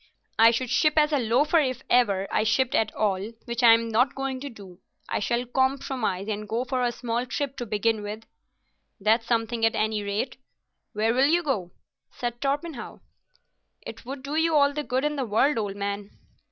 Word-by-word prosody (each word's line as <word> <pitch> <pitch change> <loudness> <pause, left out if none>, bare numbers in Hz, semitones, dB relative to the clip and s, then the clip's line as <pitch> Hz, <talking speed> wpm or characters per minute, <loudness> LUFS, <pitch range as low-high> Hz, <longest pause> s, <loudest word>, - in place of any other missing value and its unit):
I 225 +1 +8
should 235 +1 -1
ship 305 -1 +3
as 300 0 +4
a 290 - +3
loafer 265 +8 +3
if 260 -4 -1
ever 200 -6 +2
I - - +2
shipped 235 +4 +1
at 220 -1 +2
all, 205 +1 -1
which 235 +1 -3
I'm 230 -1 +6
not 245 +5 +2
going 270 -1 -3
to 285 +2 -6
do. 195 -6 -13 0.3
I - - -1
shall 235 +3 -1
compromise, 260 -6 -1
and 210 -1 -4
go 235 +3 -1
for 255 0 -1
a 245 -1 +1
small 240 +1 -3
trip 275 +1 -3
to 240 - -5
begin 215 +1 0
with." 210 +2 -6 0.8
"That's 225 +3 +2
something 230 0 0
at 225 - +3
any 215 0 0
rate. 205 +5 -3 0.6
Where 220 +2 +1
will 260 +3 +4
you 345 +3 +2
go?" 215 - -1 0.4
said 240 0 -5
Torpenhow. 285 0 -3 0.8
"It - - -9
would 265 +2 -7
do 280 +1 -5
you 320 0 +2
all 285 -1 +4
the 300 - -2
good 260 +1 -1
in 300 0 -1
the 270 - 0
world, 230 +5 +2
old 205 -2 -3
man." 200 0 -4
235 Hz, 195 wpm, -26 LUFS, 215-270 Hz, 0.8 s, I